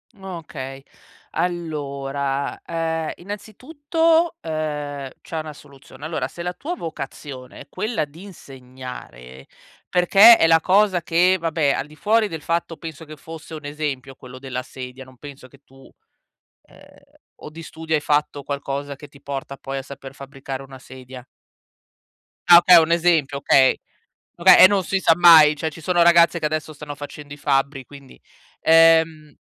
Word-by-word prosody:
Okay, 155 -8 -9 0.5
allora, 140 -5 -3
ehm, 165 -1 -3
innanzitutto, 310 - -1
ehm, 150 -3 -5
c'è 165 - -7
una 155 -1 -5
soluzione. 140 0 -15
Allora 160 0 -3
se 170 - -9
la 180 +1 -3
tua 335 - -6
vocazione 135 - -8
è - - -12
quella 215 -8 -3
di 155 +5 -15
insegnare, 125 - -12 0.4
perché 195 +6 +7
è 165 - +3
la 165 0 +4
cosa 190 0 +2
che 175 +3 +2
vabbè 160 -4 0
al - - -4
di 150 - -16
fuori 215 +4 +1
del 160 -3 -7
fatto 165 +1 -3
penso 160 -1 -9
che 155 -1 -12
fosse 160 +2 -11
un 155 -2 -9
esempio 145 -3 -5
quello 130 0 -13
della 130 -1 -6
sedia, 130 0 -10
non 130 -1 -18
penso 140 -1 -12
che 140 - -21
tu 135 0 -19 0.7
ehm, - - -19 0.6
o - - -9
di 160 +2 -11
studio 160 0 -7
hai 150 - -1
fatto 145 -1 -1
qualcosa, 140 0 -5
che 145 +2 -13
ti 140 0 -19
porta 140 0 -6
poi 135 0 -6
a - - -3
saper 135 0 -11
fabbricare 135 -1 -8
una 135 -1 -13
sedia? 130 0 -12 1.3
Ah 170 -1 +10
okay, 175 0 +7
un 165 0 +3
esempio, 160 -5 +1
okay. 135 -1 +4 0.6
Oka 185 +2 +7
e - - +9
non 195 -1 0
si 195 +2 -1
sa 165 - +3
mai. 160 -3 +7
Cioè 160 +2 -3
ci 145 - -12
sono 175 +2 +2
ragazze 170 0 +5
che 160 - -3
adesso 155 0 -3
stanno 145 0 -9
facendo 145 0 -10
i - - -11
fabbri, 135 -1 -1
quindi, 140 -1 -15 0.4
ehm 160 -2 +3
150 Hz, 160 wpm, -21 LUFS, 135-170 Hz, 1.3 s, Ah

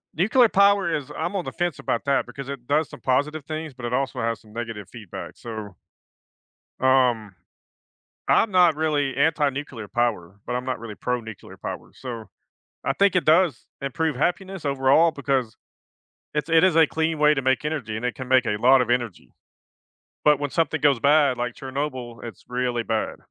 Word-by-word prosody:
Nuclear 220 - +4
power 200 -3 +3
is 145 -4 -5
I'm 180 - -2
on 190 - -1
the - - -5
fence 175 -4 -2
about 115 - -2
that 140 -1 +1
because 140 -1 -8
it 135 -3 -7
does 150 +1 +2
some - - -12
positive 145 +3 0
things, 155 -1 -5
but 125 -1 -13
it 120 - -3
also 135 0 -1
has 115 0 -1
some 105 -1 -19
negative 115 -4 -6
feedback, 105 -3 -9
so 110 -4 -7 1.1
um, 125 -6 +2 0.9
I'm 220 - +3
not 175 -4 +5
really 150 -3 0
anti-nuclear 140 -6 0
power, 105 -7 -1
but 125 - -3
I'm 125 +1 -3
not 130 -3 -3
really 110 -2 -8
pro-nuclear 115 -4 -5
power, - - -7
so 115 -5 -8 0.6
I 135 - +1
think 195 +5 +3
it 180 - +2
does 160 -4 +3
improve 140 +2 -1
happiness 185 +5 -2
overall 140 +4 +4
because 135 -6 -1 0.8
It's 150 +1 -1
it 165 +1 +5
is 185 -3 +3
a 165 -1 +7
clean 160 +1 -1
way 150 0 +5
to 135 - -2
make 130 +2 +1
energy, 140 -9 -3
and 110 - -5
it 125 - -1
can 130 -1 -7
make 130 -1 +4
a 105 - 0
lot 130 +4 +6
of 120 - -3
energy. 115 - -2 0.9
But 150 -1 +5
when 145 -1 -2
something 165 0 0
goes 140 -5 +3
bad, 140 -1 +4
like 120 0 -2
Chernobyl, 130 -3 -5
it's 115 -5 -9
really 125 -1 -1
bad. 110 -1 -2
135 Hz, 185 wpm, -24 LUFS, 120-155 Hz, 1.1 s, a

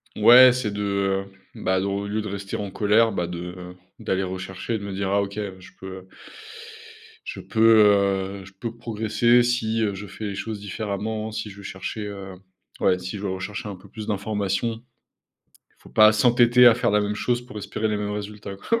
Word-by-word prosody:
Ouais, 125 +4 +8
c'est 125 -5 -2
de, 100 -1 -1 0.3
bah, 95 0 0
de 95 - -2
au 100 +1 -2
lieu 110 +1 -2
de 105 - -6
rester 100 0 -5
en 100 -2 -5
colère, 110 +3 +3
bah, 90 -4 -2
de, 85 -1 -6 0.2
heu, 90 0 -10 0.2
d'aller 95 0 -1
rechercher 95 +4 -4
et - - 0
de - - -9
me 100 - -5
dire: 95 0 -2
«Ah 100 0 +3
OK, 100 0 -5 0.2
je 90 - -13
peux», 95 - -8
heu 95 0 -11 1.2
je - - -6
peux, 110 -1 +5 0.6
heu, 95 - -12
je 95 - -15
peux 115 -1 -5
progresser 120 +1 +2
si, 115 -2 0
heu, 105 -2 0
je 105 +2 -8
fais 110 - -8
les 100 -1 -4
choses 105 +2 -5
différemment, 105 +2 -4
si 105 -1 -5
je 100 - -12
vais 100 - -11
chercher, 100 +3 -5
heu, 100 -2 -8 0.5
ouais, 90 - +3
si 95 +3 -6
je 100 - -8
vais 100 - -1
rechercher 100 +2 -5
un 100 - -6
peu 90 - -17
plus 110 -1 -8
d'informations. 105 +2 -2 1.0
Il - - -27
faut - - -15
pas 110 0 +7
s'entêter 120 +2 +5
à 120 - +8
faire 120 - 0
la 105 0 +3
même 105 0 -1
chose 120 +3 -1
pour 125 -4 -9
espérer 110 +2 -3
les 105 - 0
mêmes 105 0 -3
résultats, 105 -1 -6
quoi. 230 - -1
105 Hz, 215 wpm, -24 LUFS, 100-110 Hz, 1.2 s, Ouais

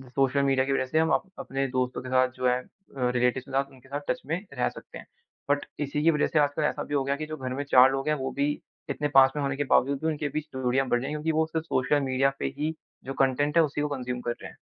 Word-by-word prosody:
Social 135 0 +2
media 135 -1 +2
की 135 - -1
वज़ह 130 - +1
से 155 +5 +1
हम 160 0 +2
अप - - +2 0.2
अपने 135 0 -2
दोस्तों 130 0 -1
के 130 - -8
साथ 130 0 +4
जो 130 0 +1
है 125 0 +2
अ, 130 -7 -5
रिलेटिवस 125 +1 +2
के 135 - -12
साथ 135 +1 0
उनके 130 0 -18
साथ 145 +1 -3
टच - - 0
में 160 +4 -1 0.2
रह 125 - +2
सकते - - -11
हैं। - - -11 0.4
बट 145 0 +1
इसी 145 +1 -1
की 165 - +6
वज़ह 150 - +1
से 155 - +1
आजकल 145 +1 +1
ऐसा 150 - 0
भी 145 - -7
हो 140 -2 +2
गया 140 +1 0
कि 155 +1 -5
जो 155 0 -6
घर 130 -1 -4
में 140 +2 -2
4 130 +1 +8
लोग 135 +2 -2
हैं, 150 - +3
वो 135 -1 -3
भी 140 +1 0 0.4
इतने 150 - -1
पास 135 0 +8
में 145 - -1
होने 140 0 -1
के 145 - +1
बावजूद 135 +1 +3
भी 160 - 0
उनके 150 -2 -1
बीच 155 0 -4
दूरियाँ 130 +1 +1
बढ़ 120 - +2
गई 130 - -5
हैं 150 - -3
क्योंकि 155 +2 -1
वो 160 +1 +2
सिर्फ 160 0 -3
सोशल 145 0 +1
मीडिया 135 +1 +3
पे - - -2
ही 155 +2 -1 0.3
जो 135 - -4
कंज्यूम 135 +2 +2
है - - +8
उसी 145 0 -2
को 150 - 0
कंज्यूम 125 -1 -4
कर 120 - -2
रहे - - -7
हैं। - - -20
135 Hz, 295 wpm, -27 LUFS, 130-150 Hz, 0.4 s, 4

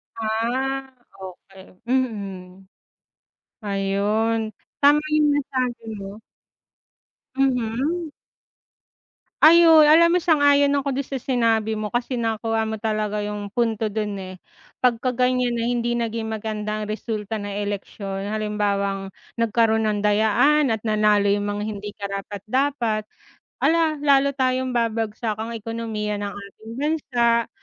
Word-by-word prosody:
Ah 245 +5 -1 0.3
okey, 190 0 -12 0.2
mm. 195 -7 -3 1.0
Ayun, 205 +3 0 0.4
tama 290 +1 +6 0.2
yung 300 -1 +4
nasabi 255 -4 -2 0.2
mo. 200 +2 -9 1.1
Mhm. 270 +5 0 1.3
Ayun, 325 -1 +8
alam 330 +3 +6
mo 355 - +3
sang-ayon 285 -4 +4
ako 270 -1 -2
dun 275 - -2
sa 265 -2 -5
sinabi 225 -4 +1
mo 215 +1 -4
kasi 245 +1 -1
nakuha 225 -1 -1
mo 220 -1 -5
talaga 215 -1 -1
yung 205 -1 -5
punto 225 -2 0
dun, 210 -1 -3
eh, 185 -1 -9 0.4
'pagka 250 0 +1
ganiyan 250 0 +1
na 235 - -2
hindi 240 -1 0
naging 230 -1 -2
maganda 215 -1 -3
ang 210 - -5
resulta 215 0 -4
ng 205 -1 -5
eleksyon 200 -1 -4
halimbawang 200 -2 -1 0.2
nagkaroon 225 -1 +2
ng 210 -1 0
dayaan, 225 +6 +3
at 215 - -4
nanalo 210 -2 +2
yung 205 0 +1
mga 205 0 -3
hindi 205 -1 -6
karapat-dapat. 215 +4 -2 0.5
Hala, 320 -1 +2
lalo 280 -1 +3
tayong 255 0 +1
babagsak 225 -2 -1
ang 230 +1 -5
ekonomiya 215 -2 -4
ng 205 - -2
ating 200 +2 -11
bansa, 245 -6 +1
225 Hz, 120 wpm, -23 LUFS, 210-255 Hz, 1.3 s, Ayun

